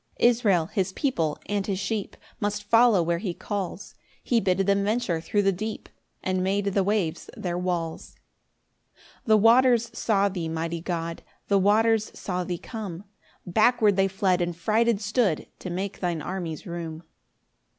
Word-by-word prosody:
5 - - +3
Israel, 220 -8 +3
his 190 +1 -2
people, 165 - -1
and 200 -1 -2
his 195 -2 -1
sheep, 205 +1 -3 0.2
Must 205 0 -2
follow 225 -3 +5
where 170 0 0
he 180 -4 -3
calls; 200 -1 -5 0.3
He 240 - +2
bid 185 -3 +1
them 200 0 +2
venture 205 -6 0
thro' 205 +4 0
the 195 - +4
deep, 215 +4 -5 0.3
And 185 -1 0
made 200 +2 0
the 200 -1 +1
waves 195 -5 -1
their 175 -2 -3
walls. 175 -2 -3 0.8
6 - - -26 0.2
The 220 -3 +5
waters 235 +1 +5
saw 200 -4 +2
thee, 180 -4 -3
mighty 165 +1 -3
God! 170 -1 -3 0.3
The 200 -1 +4
waters 220 +2 +3
saw 180 -2 -3
thee 175 0 -3
come; 200 -4 -7 0.4
Backward 215 +2 +3
they 195 0 +3
fled, 190 -2 +1
and 175 -1 -1
frighted 220 +4 +2
stood, 210 - +1
To 185 - -6
make 190 +3 -4
thine 170 -4 -2
armies 175 -2 -5
room. 170 -2 -6
195 Hz, 160 wpm, -26 LUFS, 175-215 Hz, 0.8 s, follow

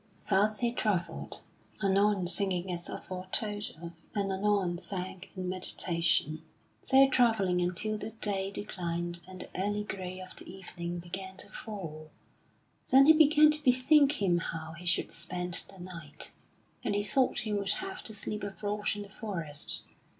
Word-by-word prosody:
Thus 210 +3 +3
he 240 -1 +2
travelled, 205 -7 -2 0.4
anon 195 0 +3
singing 180 0 +1
as 175 -1 -4
aforetold 205 +3 -4
of, 170 - -5 0.2
and 200 -1 0
anon 190 -3 +1
sank 185 -1 -6
in 185 -1 -3
meditation, 170 -4 +1 0.4
so 270 0 +6
travelling 220 -8 +3
until 185 +5 -1
the 215 - -4
day 205 -3 0
declined 175 -4 -3
and 185 -1 -8
the - - -9
early 205 +1 0
gray 185 -2 -5
of 185 0 -9
the - - -9
evening 175 -2 -6
began 190 +2 -6
to - - -7
fall. 160 -8 -7 0.8
Then 270 +1 +8
he 315 - +9
began 305 0 +7
to 300 0 +1
bethink 275 +3 +5
him 185 -8 +2
how 160 -1 -5
he 170 +2 -9
should 170 - +1
spend 180 +1 -2
the 195 - -12
night, 170 -5 -6 0.5
and 205 - 0
he 205 - +1
thought 255 +5 +2
he 215 -2 -2
would 200 -1 +1
have 380 0 -5
to 220 - -1
sleep 210 +1 -2
abroad 205 +1 -3
in 205 - -5
the 200 - -12
forest. 170 -9 0
195 Hz, 155 wpm, -31 LUFS, 175-210 Hz, 0.8 s, he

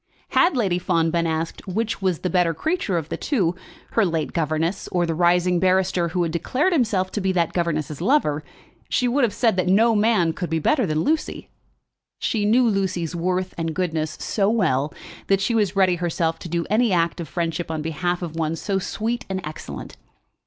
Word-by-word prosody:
Had 345 -6 +3
Lady 190 -7 +1
Fawn 165 -2 +1
been 170 0 +1
asked 160 +3 -3
which 215 +3 -2
was 185 -3 +1
the 180 - -1
better 175 -2 +2
creature 315 - -1
of 160 -2 -4
the - - -3
two, 195 - 0 0.4
her 225 - +3
late 165 -5 -1
governess 165 +3 -1
or 175 -1 0
the 165 - -1
rising 175 +1 +3
barrister 185 -1 +2
who 175 +1 0
had 165 - -1
declared 265 - 0
himself 210 - +1
to 210 - -2
be 190 0 +1
that 170 -3 +1
governess's 155 -4 -2
lover, 175 - +2 0.5
she 250 - +1
would 260 +3 +2
have 235 - +3
said 225 -4 +1
that 185 - +1
no 220 +5 +4
man 210 -6 +3
could 175 0 -4
be 165 - 0
better 235 - +2
than 155 0 0
Lucy. 315 +1 -1 0.7
She 210 -3 -1
knew 240 +4 +4
Lucy's 185 -5 -1
worth 180 +2 -1
and 165 -1 -2
goodness 160 -4 -2
so 200 -2 0
well 155 - +1 0.4
that 195 -1 +3
she 200 +4 0
was 205 -4 +1
ready 185 -2 +3
herself 165 -1 -1
to 175 - -8
do 170 0 -1
any 220 +2 +2
act 170 -1 +1
of 170 - -5
friendship 165 +3 -3
on 160 -2 -3
behalf 175 +3 -2
of 165 -2 -5
one 160 0 -1
so 195 +3 -1
sweet 230 +5 -3
and 190 0 -2
excellent. 155 +1 -8
180 Hz, 200 wpm, -23 LUFS, 165-205 Hz, 0.7 s, no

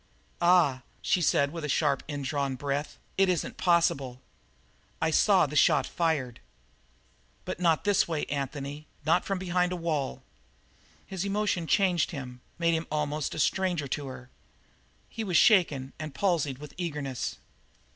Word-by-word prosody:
"Ah!" 170 -7 +4 0.2
she 180 - +2
said, 140 -2 +2
with 160 -2 -5
sharply 140 -3 +1
indrawn 140 -1 -2
breath. 140 +2 -3 0.2
"It 195 -1 +5
isn't 180 -4 -1
possible!" 140 -8 +2 0.8
"I 160 - +1
saw 190 +2 +5
the 150 +1 -6
shot - - +4
fired." 145 -8 -1 1.1
"But - - -4
not 165 -3 +2
this 205 -2 +3
way, 160 -3 -2
Anthony; 140 +1 -4 0.2
not 160 - +3
from 195 - -1
behind 180 -1 0
a - - -1
wall!" 155 - -2 0.8
His 190 -2 -4
emotion 200 -4 -1
changed 180 -3 +2
him, 125 -6 -7 0.2
made 170 -1 +2
him 165 0 -1
almost 150 -1 -2
a - - -6
stranger 175 -2 0
to 145 +1 -3
her. 125 -1 -10 0.8
He 225 - -5
was 180 -6 +2
shaking 150 - +4
and 155 -2 -6
palsied 165 -9 0
with 150 +1 -10
eagerness. 150 -7 -3
155 Hz, 145 wpm, -28 LUFS, 140-180 Hz, 1.1 s, It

